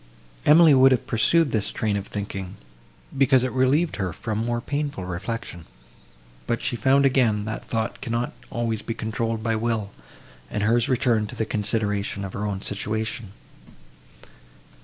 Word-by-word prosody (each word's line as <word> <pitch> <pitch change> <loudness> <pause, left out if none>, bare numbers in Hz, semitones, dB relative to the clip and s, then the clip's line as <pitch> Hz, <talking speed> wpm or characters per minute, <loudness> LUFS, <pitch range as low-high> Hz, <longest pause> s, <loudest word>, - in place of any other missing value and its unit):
Emily 160 0 +8
would 135 0 +6
have 125 - +1
pursued 140 +7 +2
this 110 -3 0
train 105 -2 -1
of 100 0 -3
thinking, 100 -2 -5 0.6
because 135 -1 +4
it 130 - -1
relieved 135 +6 +2
her 95 -3 -2
from 110 +5 -4
more 120 0 -1
painful 140 -6 -3
reflection, 90 -1 -5 0.8
but 120 0 0
she 130 - -2
found 135 +5 +3
again, 120 -6 +2
that 110 0 -5
thought 110 -1 -2
cannot 120 -2 -2 0.2
always 115 -3 -2
be 115 - -4
controlled 115 0 -2
by 115 0 +1
will; 110 -2 -1 0.6
and 105 - -2
hers 115 +2 +2
returned 115 -4 +1
to - - -8
the 110 - -1
consideration 105 -2 -1
of 95 - -7
her 105 +1 -3
own 100 -1 -4
situation. 110 0 -3
115 Hz, 155 wpm, -24 LUFS, 105-130 Hz, 0.8 s, Emily